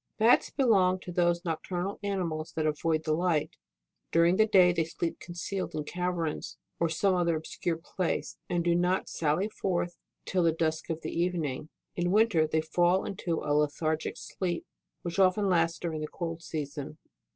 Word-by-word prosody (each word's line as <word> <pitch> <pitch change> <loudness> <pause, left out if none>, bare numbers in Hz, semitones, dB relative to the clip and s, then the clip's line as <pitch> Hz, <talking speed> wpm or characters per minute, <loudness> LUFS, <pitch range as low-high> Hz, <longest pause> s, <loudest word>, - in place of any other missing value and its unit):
11. 225 +3 +6
Bats - - -7
belong 195 -9 +3
to 180 - -8
those 175 0 +1
nocturnal 175 +3 -3
animals 175 -6 -2
that 155 - -1
avoid 155 +1 0
the 155 - +1
light; 165 -2 +1 0.6
during 170 +2 +4
the 220 +2 +4
day 185 -4 +6
they 170 -1 +1
sleep 165 +1 -4
concealed 175 +2 -4
in 155 - -2
caverns, 175 -1 -3 0.2
or 170 - +2
some 185 +4 +2
other 170 -2 +2
obscure 160 +1 -3
place, 170 +1 -3
and 175 -1 +1
do 170 0 +3
not 180 +2 +1
sally 160 +5 0
forth 180 -4 -2 0.3
till 185 - +1
the 165 -1 +4
dusk 160 0 -1
of 165 0 -3
the - - -3
evening. 165 -5 -1 0.3
In 175 0 0
winter 200 -6 +4
they 160 +1 +1
fall 175 +4 +2
into 175 -4 -2
a 145 - 0
lethargic 150 +2 0
sleep, 175 -3 -3 0.4
which 175 +2 -3
often 195 +2 +4
lasts 165 -2 +2
during 160 -3 -3
the 155 - -3
cold 165 0 -5
season. 150 -2 -5
170 Hz, 175 wpm, -29 LUFS, 160-180 Hz, 0.6 s, 11